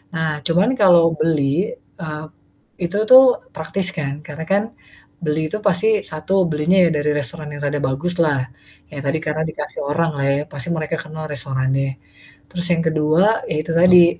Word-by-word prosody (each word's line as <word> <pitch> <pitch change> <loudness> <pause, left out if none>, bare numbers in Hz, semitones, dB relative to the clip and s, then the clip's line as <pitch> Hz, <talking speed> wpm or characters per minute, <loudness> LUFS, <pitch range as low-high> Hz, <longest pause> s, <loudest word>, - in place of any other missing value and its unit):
Nah 160 -2 -1
cuman 180 +7 +2
kalau 175 -5 +5
beli, 155 - 0
eee, 155 -9 -8 0.5
itu 175 +1 -3
tuh 255 -1 +7
praktis 180 +4 -2
kan, 145 -3 -4
karena 150 +2 -7
kan 200 +2 +2 0.6
beli 155 0 -1
itu 210 - -3
pasti 195 +2 +2 0.2
1, 180 +5 0
belinya 155 +5 +1
ya - - +1
dari 150 0 0
restoran 150 +2 -4
yang 145 - -7
rada 145 +1 -1
baguslah. 150 +2 0 0.5
Ya 145 - -7
tadi 140 +3 0
karena 155 0 -2
dikasih 150 -1 -6
orang 160 +4 0
lah 140 - -1
ya, 140 +1 +1
pasti 145 +1 -5
mereka 160 -1 -3
kenal 155 0 -8
restorannya. 135 0 -2 0.5
Terus 175 -1 -4
yang 165 -1 +2
ke-2 160 +7 +2
ya 155 - -1
itu 165 - -5
tadi, 175 0 +6
155 Hz, 165 wpm, -20 LUFS, 150-175 Hz, 0.6 s, tuh